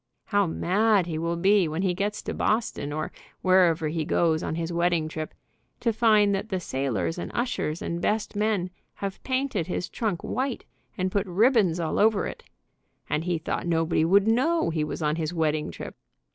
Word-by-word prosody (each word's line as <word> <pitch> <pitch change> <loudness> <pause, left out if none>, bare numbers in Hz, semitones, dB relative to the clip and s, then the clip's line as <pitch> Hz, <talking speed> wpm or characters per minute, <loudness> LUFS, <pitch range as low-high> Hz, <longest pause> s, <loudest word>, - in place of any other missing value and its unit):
How 205 -3 +2
mad 200 +4 +2
he 160 -2 -3
will 170 +1 -1
be 190 +1 +3
when 160 +4 -2
he 185 -2 +2
gets 205 +3 -2
to - - -4
Boston, 215 -9 -1
or 155 +1 -3 0.3
wherever 180 -4 +4
he 160 +1 -1
goes 160 0 +2
on - - -3
his 165 +1 -3
wedding 170 -2 +1
trip, 155 0 -5 0.5
to 230 - +1
find 215 -3 +4
that 195 +3 -2
the 190 - -1
sailors 135 - -2
and - - -5
ushers 235 -10 -1
and 170 0 -3
best 215 +2 -1
men 205 -4 0 0.2
have 195 -1 -5
painted 260 -9 -1
his 180 0 -3
trunk 210 -7 -2
white, 260 0 -2 0.3
and 185 -1 -1
put 200 0 0
ribbons 195 -2 +3
all 165 -2 -1
over 215 -1 +3
it, - - -7 0.7
and 155 - 0
he 175 -2 0
thought 160 - -3
nobody 165 -1 +2
would 195 +5 +4
know 255 - +2
he 155 -1 0
was 150 +1 -4
on 150 +1 +1
his 160 +1 -2
wedding 155 -2 0
trip. 85 - -8
180 Hz, 185 wpm, -26 LUFS, 160-210 Hz, 0.7 s, wherever